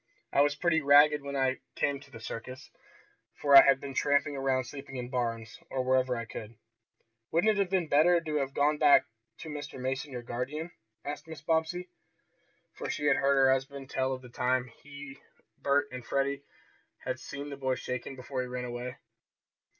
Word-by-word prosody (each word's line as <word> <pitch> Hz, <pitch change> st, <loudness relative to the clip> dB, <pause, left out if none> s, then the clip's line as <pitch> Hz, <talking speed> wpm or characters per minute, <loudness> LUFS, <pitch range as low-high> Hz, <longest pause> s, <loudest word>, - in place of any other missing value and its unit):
I -, -, +5 dB
was 145 Hz, 0 st, +3 dB
pretty 160 Hz, +1 st, +2 dB
ragged 145 Hz, +1 st, +6 dB
when 140 Hz, 0 st, -6 dB
I 130 Hz, -1 st, +1 dB, 0.2 s
came 140 Hz, -1 st, 0 dB
to 140 Hz, 0 st, -17 dB
the 120 Hz, -4 st, -11 dB
circus, 115 Hz, +3 st, -8 dB, 0.7 s
for 140 Hz, -1 st, +5 dB
I -, -, +13 dB
had 135 Hz, -1 st, +4 dB
been 140 Hz, -1 st, -7 dB
tramping 145 Hz, +1 st, +1 dB
around 135 Hz, -1 st, +1 dB
sleeping 135 Hz, +1 st, -9 dB
in 125 Hz, -1 st, -5 dB
barns, 115 Hz, -3 st, -3 dB
or 130 Hz, -1 st, -1 dB
wherever 130 Hz, -1 st, +2 dB
I 115 Hz, -, -4 dB
could." 110 Hz, 0 st, -8 dB, 0.7 s
"Wouldn't 175 Hz, +7 st, +3 dB
it 210 Hz, -, -1 dB
have 195 Hz, -2 st, +1 dB
been 185 Hz, -3 st, +1 dB
better 165 Hz, +4 st, +5 dB
to 155 Hz, -2 st, -4 dB
have 135 Hz, -1 st, -2 dB
gone 150 Hz, +1 st, +2 dB
back 145 Hz, -2 st, +6 dB, 0.4 s
to 160 Hz, -, -7 dB
Mr. 145 Hz, -3 st, -7 dB
Mason, 135 Hz, +3 st, -3 dB
your 125 Hz, -2 st, -6 dB
guardian?" 135 Hz, +8 st, -4 dB, 0.3 s
asked 145 Hz, +2 st, -5 dB
Mrs. 160 Hz, -2 st, -10 dB
Bobbsey, 165 Hz, +2 st, 0 dB, 0.9 s
for -, -, -6 dB
she 145 Hz, -, -2 dB
had -, -, +4 dB
heard 140 Hz, 0 st, +3 dB
her 135 Hz, -1 st, +5 dB
husband 135 Hz, 0 st, -2 dB
tell 130 Hz, 0 st, 0 dB
of 130 Hz, 0 st, -5 dB
the 125 Hz, -, -11 dB
time 125 Hz, 0 st, 0 dB
he, 145 Hz, -1 st, -10 dB, 0.4 s
Bert 145 Hz, +1 st, +2 dB
and 125 Hz, -1 st, -7 dB
Freddie 140 Hz, +2 st, -1 dB, 0.6 s
had -, -, -2 dB
seen 145 Hz, +1 st, -7 dB
the -, -, -4 dB
boy 130 Hz, -1 st, 0 dB
shaken 125 Hz, +2 st, -5 dB
before 130 Hz, 0 st, -4 dB
he 125 Hz, -, -4 dB
ran 125 Hz, 0 st, -4 dB
away. 125 Hz, +1 st, -5 dB
140 Hz, 190 wpm, -30 LUFS, 130-145 Hz, 0.9 s, I